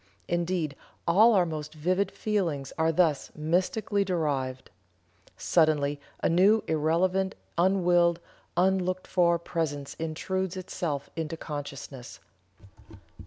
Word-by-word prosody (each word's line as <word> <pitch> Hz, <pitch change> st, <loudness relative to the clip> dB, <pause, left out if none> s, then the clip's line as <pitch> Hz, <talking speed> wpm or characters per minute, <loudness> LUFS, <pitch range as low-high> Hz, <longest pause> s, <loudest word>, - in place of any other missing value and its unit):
Indeed 175 Hz, -4 st, -1 dB, 0.3 s
all 215 Hz, +7 st, +6 dB
our 185 Hz, -2 st, +4 dB
most 155 Hz, -1 st, -5 dB
vivid 185 Hz, +5 st, +1 dB
feelings 170 Hz, -11 st, -2 dB
are 160 Hz, 0 st, +2 dB
thus 160 Hz, -4 st, +2 dB
mystically 185 Hz, +6 st, 0 dB
derived. 145 Hz, -8 st, -2 dB, 0.7 s
Suddenly 145 Hz, -3 st, +2 dB, 0.2 s
a -, -, +4 dB
new 195 Hz, +6 st, +4 dB
irrelevant, 175 Hz, +5 st, +1 dB, 0.2 s
unwilled, 175 Hz, -1 st, +3 dB, 0.4 s
unlooked 185 Hz, 0 st, +1 dB
for 170 Hz, -2 st, +3 dB
presence 150 Hz, -4 st, -3 dB
intrudes 185 Hz, +4 st, -2 dB
itself 170 Hz, -6 st, -4 dB
into 160 Hz, 0 st, -3 dB
consciousness. 140 Hz, -, -7 dB
170 Hz, 100 wpm, -28 LUFS, 150-185 Hz, 0.7 s, all